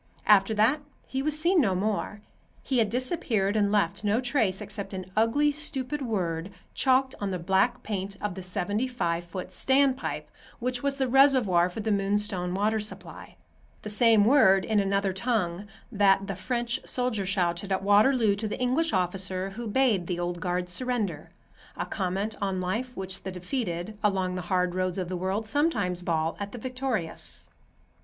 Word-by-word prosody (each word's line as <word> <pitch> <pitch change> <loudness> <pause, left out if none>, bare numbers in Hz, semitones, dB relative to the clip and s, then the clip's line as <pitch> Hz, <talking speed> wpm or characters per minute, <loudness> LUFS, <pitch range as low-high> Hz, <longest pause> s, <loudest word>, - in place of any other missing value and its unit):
After 210 +1 +5
that 235 +8 +3 0.2
he 265 - -3
was 300 +1 +1
seen 340 +2 +4
no 195 -8 +1
more. 205 +1 -2 0.4
He 260 -3 0
had 220 -2 +2
disappeared 230 - 0
and 205 -2 +2
left 205 0 +1
no 210 +2 +2
trace 240 -7 +1
except 200 -1 -5
an 185 -1 -5
ugly, 230 +7 +3
stupid 295 -1 -4
word, 180 -8 -2 0.2
chalked 260 0 +2
on 200 - -1
the 185 - -2
black 190 +8 +1
paint 200 -1 -4
of 210 -3 -3
the 190 - -7
seventy 200 +6 -1
five 170 -9 -2
foot 180 +2 -7
standpipe 265 +6 +1 0.3
which 250 0 -2
was 280 -1 -1
the 265 -1 +1
reservoir 245 -10 +4
for 200 +5 -6
the 220 +1 -1
Moonstone 195 -2 0
water 215 +3 +1
supply; 210 0 -7 0.5
the 210 - -3
same 220 -1 +5
word, 195 -7 +5
in 215 -2 +2
another 200 -1 +1
tongue, 195 -3 -1 0.2
that 195 -2 +3
the 195 -1 -4
French 240 +4 -2
soldier 245 -6 -1
shouted 185 0 -1
at 190 0 0
Waterloo 210 +2 +4
to 215 +1 -3
the 210 - -5
English 255 +4 +1
officer 185 +1 -1
who 230 +4 -6
bade 215 -6 +2
the 175 -1 -2
Old 175 0 -2
Guard 180 +1 -1
surrender; 205 - -3 0.5
a - - -2
comment 195 +2 -2
on 195 -2 -1
life 225 +8 -3
which 190 0 -6
the 190 - -5
defeated, 180 0 -4
along 190 -3 +1
the 180 - -3
hard 180 0 0
roads 185 0 -1
of 180 -2 -3
the 185 - -3
world, 190 +4 -2
sometimes 215 - 0
bawl 165 -2 -1
at 200 0 -5
the - - -6
victorious. 250 -7 -4
205 Hz, 175 wpm, -27 LUFS, 185-245 Hz, 0.5 s, After